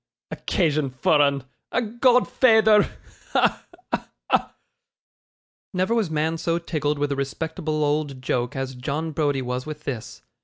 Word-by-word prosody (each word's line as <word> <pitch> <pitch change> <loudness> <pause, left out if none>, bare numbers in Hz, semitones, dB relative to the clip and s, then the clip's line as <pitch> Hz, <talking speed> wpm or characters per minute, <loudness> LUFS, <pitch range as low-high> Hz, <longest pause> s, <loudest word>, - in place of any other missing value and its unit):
Occasion 155 -6 0
for 130 +4 +3
'un 140 -2 +2 0.3
a - - +2
godfeyther! 235 -2 +4 0.4
Ha! - - +2 0.3
ha! - - -2 0.2
ha!' - - +1 1.2
Never 185 +5 +1
was 225 -7 +1
man 160 +1 0
so 165 +1 0
tickled 150 -3 -1
with 145 0 -1
a - - +1
respectable 155 +2 -2
old 145 -2 0
joke, 125 +1 -1
as 135 0 -3
John 150 +5 -3
Browdie 145 -3 0
was 125 +2 -3
with 150 -1 -7
this. 125 -7 -6
150 Hz, 140 wpm, -24 LUFS, 140-170 Hz, 1.2 s, godfeyther